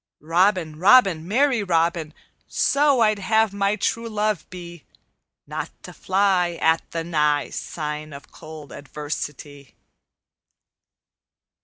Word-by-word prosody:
Robin! 170 -1 +1
Robin! 190 -5 +5
Merry 250 +3 +2
Robin! 165 -3 0 0.4
So 280 -3 +2
I'd 215 -2 +3
have 220 +1 +2
my 200 +1 +1
true 230 +1 -2
love 215 -4 -2
be: 175 -3 -10 0.6
Not - - -5
to - - -10
fly 185 -3 +1
At 160 0 +3
the 165 0 -4
nigh 150 -3 0
Sign 150 -1 -5
of 140 0 -12
cold 155 -3 -11
adversity_. 145 0 -7
175 Hz, 110 wpm, -23 LUFS, 155-210 Hz, 0.6 s, Robin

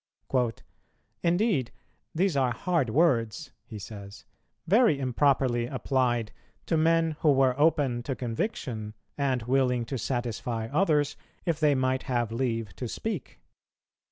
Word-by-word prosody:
"Indeed, 175 - +1 0.4
these 185 -1 +2
are 130 -2 +3
hard 160 0 0
words," 135 -1 +1 0.2
he 110 - -8
says, 100 0 -10 0.4
"very 210 - +4
improperly 130 -2 +2
applied 125 -3 0 0.3
to 165 - 0
men 165 0 +2
who 155 - +4
were 135 -2 +4
open 145 -6 +2
to 130 +2 -3
conviction, 115 - -3 0.2
and 135 -4 0
willing 125 -1 +1
to 130 +2 -4
satisfy 120 -1 -2
others, 150 -3 +2 0.3
if 165 -4 0
they 150 -2 +4
might 130 0 +1
have 120 -3 0
leave 115 -5 -2
to 125 - -4
speak." 200 - -5
130 Hz, 125 wpm, -28 LUFS, 120-155 Hz, 0.4 s, very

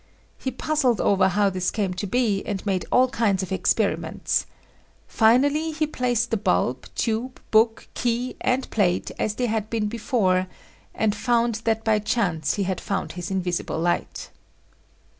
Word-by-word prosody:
He 265 - -2
puzzled 265 -5 0
over 195 -1 +3
how 200 +1 +2
this 185 -1 -1
came 200 -4 -1
to 190 +3 -4
be 215 -3 +1
and 200 -1 -3
made 190 -3 -1
all 255 +1 +5
kinds 205 -6 +1
of 190 - -7
experiments. 190 - 0 0.6
Finally 285 +8 +3
he 310 0 0
placed 245 -5 -1
the 225 - +2
bulb, 125 - 0
tube, 235 +3 -2
book, 225 +1 +3
key 245 +1 -1
and 255 +1 0
plate 180 -5 +1
as 215 - -1
they 250 - 0
had 220 -2 -1
been 225 -2 -1
before 205 -5 +1 0.5
and 215 -1 +1
found 235 -2 +1
that 225 -1 +1
by 220 -1 +2
chance 195 -8 0
he 200 - 0
had 190 -1 -2
found 195 -5 -3
his 175 +1 -6
invisible 180 -4 -2
light. 175 +1 -2
215 Hz, 160 wpm, -24 LUFS, 190-240 Hz, 0.6 s, all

